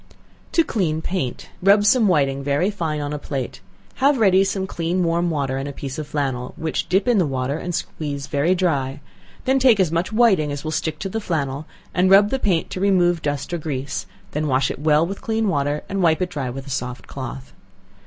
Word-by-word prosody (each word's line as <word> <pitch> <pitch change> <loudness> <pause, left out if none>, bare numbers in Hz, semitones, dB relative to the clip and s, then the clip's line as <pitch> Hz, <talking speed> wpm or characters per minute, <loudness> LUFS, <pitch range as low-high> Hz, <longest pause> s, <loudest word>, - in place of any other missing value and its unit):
To 330 - +5
Clean 170 - -1
Paint. 170 -10 -3
Rub 200 +2 +5
some 225 +1 +5
whiting 140 -6 +2
very 145 +8 +1
fine 160 -6 -2
on 145 0 -3
a 150 - -3
plate; 135 -7 -5 0.4
have 275 +1 +3
ready 195 -4 +5
some 195 0 -1
clean 175 0 -1
warm 170 +1 +1
water, 140 -4 -1
and 135 +1 -3
a - - -4
piece 135 0 -6
of 150 - -5
flannel, 135 -4 -2
which 160 -1 -2
dip 190 +6 +2
in 240 -4 +4
the 180 - +3
water 130 0 -1
and 175 -1 -3
squeeze 145 -3 -4
very 155 +5 +1
dry; 145 -7 0 0.5
then 265 0 +3
take 250 -5 +5
as 180 -5 +3
much 170 +5 -1
whiting 205 -10 +3
as 145 0 -5
will 155 - -3
stick 155 0 -2
to 195 - -4
the 225 +3 -3
flannel, 150 -5 -2 0.3
and 185 +1 +3
rub 200 +2 +6
the 270 - 0
paint 185 -9 0
to - - -4
remove 175 -4 +3
dust 145 +3 -3
or 175 - -1
grease, 140 -3 -4 0.2
then 150 +1 -1
wash 135 -1 +2
it - - -7
well 155 +1 +3
with 195 +3 -6
clean 220 -1 0
water 145 -4 0
and 195 0 -2
wipe 160 -3 +3
it 180 -1 -2
dry 140 -6 -3
with 135 +2 -6
a 140 - -8
soft 125 -1 -4
cloth. 65 +1 -7
160 Hz, 220 wpm, -22 LUFS, 140-190 Hz, 0.5 s, rub